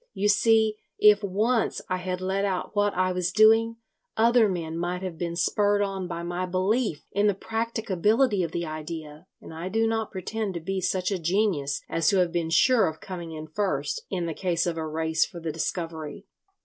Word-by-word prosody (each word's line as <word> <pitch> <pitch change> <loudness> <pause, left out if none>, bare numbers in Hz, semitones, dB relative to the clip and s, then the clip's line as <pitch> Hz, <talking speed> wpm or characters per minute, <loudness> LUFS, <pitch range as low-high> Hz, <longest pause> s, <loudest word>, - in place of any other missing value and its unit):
You 205 +2 +1
see, 220 +1 +3 0.2
if 210 0 +6
once 215 +5 +1
I 185 - -1
had 180 0 -4
let 190 +1 -1
out 195 +1 -2
what 205 0 +3
I 185 0 +1
was 180 0 -1
doing, 225 +2 +5 0.4
other 230 -1 +5
men 165 -3 -3
might 175 +2 -3
have 185 -3 -4
been 170 +1 -3
spurred 205 +4 +2
on 195 -2 -3
by 170 -1 -5
my 175 +1 -3
belief 185 - 0
in 205 +1 +2
the 205 - +2
practicability 225 0 0
of 165 -2 -2
the 170 0 -2
idea; 155 +1 -7
and - - -11
I 165 +3 -5
do 225 +3 +1
not 225 -1 -1
pretend 200 +1 -4
to - - -2
be 190 +3 -3
such 185 +1 0
a 195 - -1
genius 170 -5 0
as 165 -1 -1
to 195 - +4
have 180 -2 +2
been 165 -1 -1
sure 225 +9 +4
of 160 - -9
coming 175 -3 -7
in 155 0 -6
first, 155 -5 -2
in 180 -3 -2
the 165 - -3
case 170 -1 0
of 170 -2 -1
a 160 -1 -3
race 160 +1 +1
for 170 - -6
the 165 -1 -3
discovery. 165 +2 -4
185 Hz, 200 wpm, -26 LUFS, 165-205 Hz, 0.4 s, if